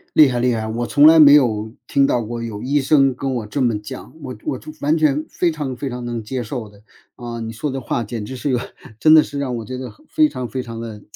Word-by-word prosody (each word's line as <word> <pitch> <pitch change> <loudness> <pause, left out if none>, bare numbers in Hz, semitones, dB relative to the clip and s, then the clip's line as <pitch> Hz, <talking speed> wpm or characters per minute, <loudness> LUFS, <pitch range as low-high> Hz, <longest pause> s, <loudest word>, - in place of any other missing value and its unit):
厉 155 - +8
害 125 -2 -1
厉 125 0 +2
害， 110 -1 -3
我 115 +2 -2
从 145 +4 +5
来 160 0 +7
没 145 -2 +9
有 110 -6 +2
听 140 - +3
到 125 - +1
过 115 +1 -5
有 110 -3 -6
医 140 +3 +1
生 135 -2 +3
跟 135 +1 -3
我 115 -4 -4
这 135 +7 -3
么 115 -4 +1
讲， 105 - -9
我 130 -4 -7
我 130 - -3
就 - - -12
完 150 +3 +2
全 155 -1 +1
非 175 - 0
常 145 -5 -5
非 135 +2 -4
常 125 0 -6
能 120 -1 -4
接 125 +3 -4
受 115 0 -5
的。 100 0 -19 0.3
嗯， 115 -2 -6
你 115 - -6
说 135 +6 -3
的 135 - -3
话 120 -2 -2
简 110 -1 -5
直 130 - -7
是 135 +3 -3
一 - - +1
个， 125 - +1 0.4
真 155 +4 +6
的 155 -1 +8
是 145 - -6
让 130 -3 -2
我 115 - -5
觉 125 +4 -6
得 130 -1 -6 0.2
非 310 -1 +3
常 125 - -6
非 130 +4 -3
常 115 -2 -8
地， 110 -3 -8
125 Hz, 295 characters per minute, -20 LUFS, 115-140 Hz, 0.4 s, 没